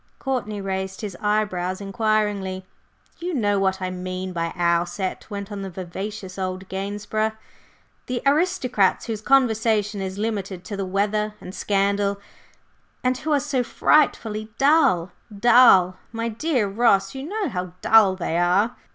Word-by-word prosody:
Courtney 230 -6 -3
raised 190 -1 -4
his 205 -4 -5
eyebrows 200 -4 0
inquiringly. 200 -2 -1 0.5
"You 350 -1 -3
know 205 -5 +1
what 190 -1 +1
I 185 - -2
mean 185 0 -5
by 165 -1 -2
our 170 -1 +2
set," 185 +4 -5
went 200 -1 -6
on 200 -1 -5
the 195 - -5
vivacious 190 +2 -6
old 185 0 -4
"Gainsborough," 205 +3 -2 0.7
"the 250 -1 -3
aristocrats 275 - +2
whose 220 -3 -4
conversation 220 -5 +2
is 190 0 -4
limited 200 -4 -3
to 205 - -6
the 195 -1 -3
weather 210 +2 0
and 185 - -9
scandal, 200 0 0 0.8
and 255 0 +2
who 310 - -3
are 290 - +4
so 270 -3 -1
frightfully 220 -6 +1
dull! 275 - +3 0.3
Dull! 200 -6 +6
My 230 0 -2
dear 240 -1 0
Ross, 195 -2 +2
you 265 - -6
know 395 +7 -2
how 180 -1 -4
dull 215 -4 +6
they 170 -2 -1
are!" 190 +7 +2
205 Hz, 145 wpm, -23 LUFS, 190-230 Hz, 0.8 s, Dull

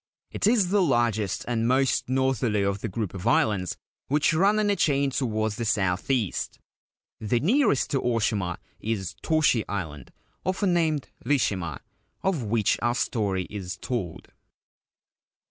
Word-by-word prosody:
It - - 0
is 215 -5 +3
the 200 +1 +3
largest 120 - +1
and 115 -1 0
most 130 0 +2
northerly 130 -5 +1
of 100 0 -1
the - - -2
group 105 0 -3
of 95 +3 -5
islands 100 -6 +2 0.3
which 150 +4 +2
run 195 +6 +3
in 210 -1 +2
a - - +2
chain 140 -5 +2
towards 110 -5 -1
the 120 - -2
south 95 -4 0
east. 120 -9 -1 0.6
The 115 +2 0
nearest 190 - +2
to 135 - +1
Oshima 105 -7 0 0.2
is 105 -5 -3
Toshi 155 -8 +2
Island, 80 -10 -5 0.3
often 185 0 +1
named 160 -5 +1
Rishima, 100 - 0 0.4
of 190 -7 +1
which 110 -2 +1
our 120 0 +1
story 100 -7 0
is 95 -3 -5
told. 105 -10 -4
115 Hz, 145 wpm, -26 LUFS, 100-145 Hz, 0.6 s, is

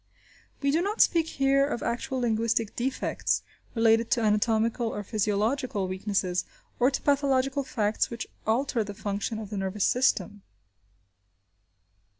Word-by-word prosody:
We 280 - +3
do 320 +4 +2
not 410 +4 -2
speak 330 -2 +4
here 275 -2 +2
of 265 - -3
actual 250 +3 -2
linguistic 230 -1 0
defects 260 +2 -1 0.3
related 225 0 +3
to 240 - +2
anatomical 220 +2 +1
or 210 -2 -4
physiological 215 +1 0
weaknesses, 185 -1 -1 0.4
or 250 +2 +5
to 275 - -4
pathological 275 -1 +2
facts 215 -4 0
which 230 -1 -5 0.2
alter 235 +1 +1
the 205 -1 -8
function 205 +2 -3
of 215 -2 -7
the 205 - -3
nervous 195 +1 -1
system. 205 -5 +1
230 Hz, 135 wpm, -27 LUFS, 210-265 Hz, 0.4 s, or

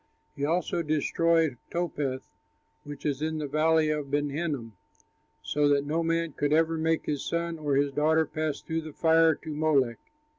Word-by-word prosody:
He 140 - -5
also 170 +2 0
destroyed 160 -1 +1
Topheth, 145 -6 -3 0.5
which 145 -1 -9
is 145 -1 -1
in 160 0 -1
the 155 - -3
valley 155 +2 +2
of 150 -2 -3
Ben 145 0 0
Hinnom, 140 -7 -3 0.7
so 145 0 +1
that 140 0 +2
no 155 +3 0
man 165 0 0
could 145 0 -1
ever 165 +1 +3
make 160 0 0
his 145 -3 -2
son 170 -1 -2
or 145 -2 0
his 140 0 +2
daughter 155 +3 +2
pass 155 -1 -3
through 160 0 -3
the 155 -1 -9
fire 165 0 +4
to 155 +1 -8
Molech. 145 -6 +1
155 Hz, 175 wpm, -28 LUFS, 145-165 Hz, 0.7 s, fire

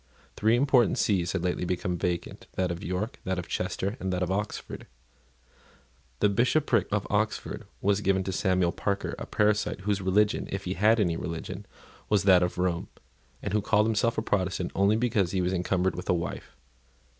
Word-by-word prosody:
Three 110 +2 +3
important 125 -3 +3
sees 90 -4 +1
had 95 -3 -1
lately 90 0 -1
become 90 0 -1
vacant, 85 -1 -3
that 90 -1 0
of 85 - -5
York, 95 - -3
that 95 0 -2
of 90 -2 -4
Chester, 100 +5 -2
and 95 0 -2
that 90 0 0
of 90 - -2
Oxford. 100 +2 -4 1.3
The - - +6
Bishopric 120 - +2
of 105 -1 0
Oxford 105 +1 -1
was 100 +1 +2
given 95 -1 +2
to 95 - -3
Samuel 95 -1 +1
Parker, 100 +2 -2
a - - -6
parasite, 105 -2 +1
whose 100 0 0
religion, 100 +3 +2
if 100 0 -3
he 95 - -2
had 110 +4 +3
any 85 -5 +1
religion, 90 +4 -6 0.4
was 105 -2 +3
that 95 -2 +6
of 90 0 -1
Rome, 90 -1 0 0.6
and - - -3
who 105 - +2
called 105 +1 +3
himself 115 +1 +1
a 110 - 0
Protestant 95 -3 -1
only 100 +2 +3
because 110 -6 +1
he 95 - +1
was 90 +1 0
encumbered 90 0 0
with 90 - -7
a 90 - +4
wife. 85 0 -5
95 Hz, 185 wpm, -28 LUFS, 90-105 Hz, 1.3 s, The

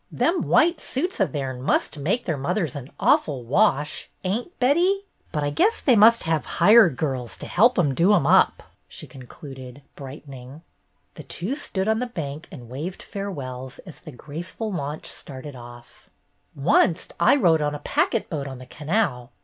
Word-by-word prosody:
"Them 340 +1 +1
white 335 0 +3
suits 335 - -2
o' 195 - +4
theirn 130 -4 -4
must 145 +2 0
make 195 - -1
their 165 - -1
mothers 160 +2 -2
an 140 -1 -7
awful 135 -5 +2
wash, 150 - +1
ain't, 230 - -3
Betty? 350 +10 +2 0.3
But 150 - -2
I 145 - -1
guess 430 - +2
they 255 - +3
must 225 +2 +6
have 160 -2 0
hired 210 - +6
girls 130 -5 -3
to - - -8
help 240 +7 +3
'em 150 -7 +2
do 170 +9 +3
'em 170 - +1
up," - - +4 0.2
she - - -9
concluded, 130 0 -11
brightening. 135 +1 -10 0.5
The - - -10
two 190 +10 -4
stood 195 -9 -3
on 220 0 +2
the 250 - -2
bank 155 -7 -6
and 120 - -10
waved 150 +10 -6
fare 200 -1 -5
wells 130 -5 -7
as 175 - -11
the 155 - -11
graceful 170 - -6
launch 150 -4 -4
started 135 0 -9
off. 120 -1 -14 0.2
" - - -31
Oncet 165 +5 +2
I 170 +10 +5
rode 170 - +3
on 145 0 -1
a 145 - -10
packet - - 0
boat 145 -4 -4
on 130 -1 -7
the 130 - -11
canal. 145 - -2
155 Hz, 180 wpm, -24 LUFS, 135-205 Hz, 0.5 s, must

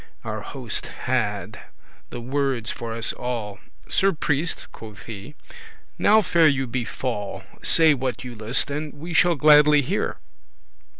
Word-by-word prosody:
Our - - -4
Hoste - - -3
had. - - -2 0.5
the 120 - -7
wordes 130 -2 -1
for 115 -1 -6
us 115 +1 -2
all: 115 -5 -4 0.3
"Sir 195 +1 +3
Priest," 155 +1 -1
quoth 110 -3 -11
he, 110 +6 -9 0.6
"now 215 +1 +5
faire 170 -3 +4
you 135 -2 0
befall; 120 -4 -4 0.2
Say 160 -2 +5
what 130 -3 -3
you 125 -1 -7
list, 115 +5 +1
and 150 +1 -4
we 165 +4 -7
shall 175 +1 +4
gladly 150 0 +6
hear." - - -2
135 Hz, 135 wpm, -23 LUFS, 115-150 Hz, 0.6 s, gladly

